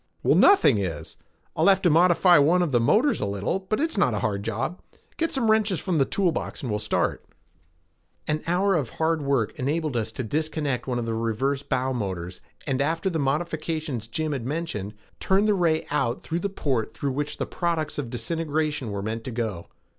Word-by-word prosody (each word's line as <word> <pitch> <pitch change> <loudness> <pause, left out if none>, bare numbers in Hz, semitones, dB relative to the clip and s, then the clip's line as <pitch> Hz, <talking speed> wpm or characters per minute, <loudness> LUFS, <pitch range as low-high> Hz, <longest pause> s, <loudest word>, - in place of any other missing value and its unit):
"Well, - - +4
nothing 260 - +6
is. 85 -6 -4 0.4
I'll 160 - +2
have 195 -1 +4
to 175 - +4
modify 175 +1 +5
one 170 +5 +4
of 165 - -1
the 120 - +3
motors 225 - +3
a - - 0
little, 100 - -1
but 195 +3 -2
it's 320 -8 0
not 125 - +3
a 100 - -1
hard 100 -2 -1
job. 115 - -3 0.3
Get 330 0 -1
some 235 -5 +2
wrenches 210 -4 +2
from 180 -5 0
the 135 - +4
tool 185 +2 +1
box 160 - -5
and 125 - -2
we'll 105 - 0
start." - - -1 1.0
An 155 0 0
hour 190 +3 +2
of 145 -9 0
hard 160 0 +1
work 140 -6 0
enabled 150 +1 -1
us 110 -1 -1
to 130 - -4
disconnect 150 0 -2
one 125 -2 -1
of 120 - -2
the 115 - -2
reserve 115 +5 -1
bow 130 +1 0
motors 95 -6 -4 0.2
and, 135 -2 0
after 165 +6 0
the 165 - -1
modifications 155 -3 -2
Jim 155 +7 -2
had 130 -4 -3
mentioned, 130 - -4 0.2
turn 195 +2 +2
the 210 - +3
ray 165 -4 +1
out 130 -5 0
through 165 +1 -2
the 200 - -2
port 130 - -2
through 140 +3 -2
which 145 +2 -3
the - - -2
products 165 -4 -2
of 130 -5 -4
disintegration 150 0 -2
were 100 -1 -4
meant 110 +2 -3
to 130 - -4
go. 110 -7 -3
145 Hz, 205 wpm, -25 LUFS, 115-170 Hz, 1.0 s, nothing